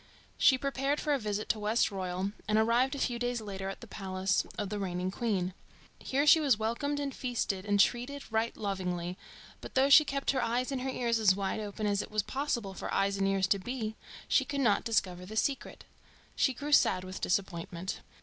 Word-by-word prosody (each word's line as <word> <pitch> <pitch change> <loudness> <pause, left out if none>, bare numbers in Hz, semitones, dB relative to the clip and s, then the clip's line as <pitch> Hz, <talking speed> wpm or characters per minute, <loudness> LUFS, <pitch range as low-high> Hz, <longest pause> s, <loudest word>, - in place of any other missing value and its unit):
She 260 - +6
prepared 275 +1 -1
for 300 - 0
a 280 - +1
visit 210 -1 -3
to 220 - +1
Westroyal, 195 -3 0 0.2
and 215 - +2
arrived 240 +5 +3
a - - -5
few 240 -3 -1
days 245 0 -1
later 195 -3 -5
at 195 - -7
the 235 - -10
palace 190 -2 -1
of 205 -3 -2
the 210 0 -3
reigning 180 -1 -2
queen. 190 -5 -1 0.5
Here 280 +2 0
she 320 +2 +8
was 275 -8 +3
welcomed 235 +7 -1
and 280 -1 -3
feasted 225 -6 -2
and 205 0 +2
treated 250 +7 +1
right 225 +1 0
lovingly, 180 -3 -3 0.5
but - - -10
though 270 +2 +4
she 305 - +10
kept 275 -1 -1
her 265 -2 0
eyes 245 +3 0
and 265 -2 -2
her 265 - -2
ears 235 -3 0
as 200 -4 +5
wide 195 +2 -2
open 210 0 -4
as 205 -1 +1
it - - -8
was 215 -1 0
possible 240 -6 -2
for - - -6
eyes 200 0 +1
and 195 0 +1
ears 195 -1 +2
to 200 - +3
be, 220 +1 -4 0.3
she 270 - +3
could 280 +1 -3
not 215 -6 +3
discover 185 -5 0
the 205 +4 -8
secret. 270 +4 -1 0.5
She 265 - +2
grew 290 +4 -5
sad 185 -9 +4
with 185 0 -7
disappointment. 180 -1 -2
215 Hz, 205 wpm, -31 LUFS, 195-260 Hz, 0.5 s, she